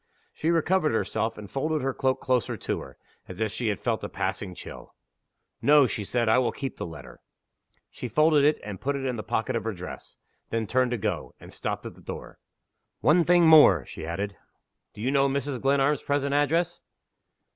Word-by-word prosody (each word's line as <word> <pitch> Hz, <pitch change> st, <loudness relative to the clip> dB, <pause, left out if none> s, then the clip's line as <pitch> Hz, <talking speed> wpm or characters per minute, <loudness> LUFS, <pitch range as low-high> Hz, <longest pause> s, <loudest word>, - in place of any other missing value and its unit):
She 160 Hz, -, -2 dB
recovered 170 Hz, -2 st, +2 dB
herself, 110 Hz, 0 st, -1 dB
and 105 Hz, -1 st, -8 dB
folded 155 Hz, +3 st, -2 dB
her 135 Hz, 0 st, 0 dB
cloak 130 Hz, 0 st, 0 dB
closer 125 Hz, -2 st, 0 dB
to -, -, -3 dB
her, -, -, -11 dB, 0.3 s
as 90 Hz, -, -9 dB
if 110 Hz, -2 st, 0 dB
she 120 Hz, -, -3 dB
had 105 Hz, -2 st, -1 dB
felt -, -, -1 dB
a -, -, -4 dB
passing 90 Hz, -3 st, -3 dB
chill. -, -, -11 dB, 0.7 s
"No," 145 Hz, -1 st, +6 dB
she 105 Hz, -3 st, -3 dB
said; 120 Hz, +3 st, 0 dB
"I 110 Hz, +3 st, +5 dB
will 125 Hz, -, +1 dB
keep 135 Hz, -3 st, -5 dB
the -, -, -4 dB
letter." 70 Hz, -7 st, -11 dB, 0.7 s
She 125 Hz, -, -6 dB
folded 150 Hz, +4 st, +4 dB
it 150 Hz, +2 st, +3 dB
and 100 Hz, -3 st, -7 dB
put 140 Hz, +2 st, -1 dB
it 135 Hz, -1 st, -3 dB
in 130 Hz, -2 st, -1 dB
the 110 Hz, -, -4 dB
pocket 115 Hz, +3 st, -2 dB
of 115 Hz, -, -1 dB
her 115 Hz, 0 st, -2 dB
dress. 90 Hz, 0 st, -9 dB, 0.3 s
Then 115 Hz, -1 st, -1 dB
turned 125 Hz, +3 st, +1 dB
to 120 Hz, -, -1 dB
go 100 Hz, -, -3 dB
and -, -, -13 dB
stopped -, -, -4 dB
at -, -, -6 dB
the -, -, -18 dB
door. -, -, -8 dB, 0.6 s
"One 170 Hz, +3 st, +5 dB
thing 175 Hz, 0 st, +5 dB
more," 145 Hz, -, +7 dB
she -, -, -9 dB
added. 100 Hz, +4 st, -3 dB, 0.6 s
"Do 105 Hz, -, -9 dB
you 130 Hz, +4 st, 0 dB
know 140 Hz, 0 st, +3 dB
Mrs. 140 Hz, -2 st, -2 dB
Glenarm's 140 Hz, +1 st, +2 dB
present 140 Hz, 0 st, 0 dB
address?" 165 Hz, +4 st, +1 dB
130 Hz, 200 wpm, -26 LUFS, 110-145 Hz, 0.7 s, more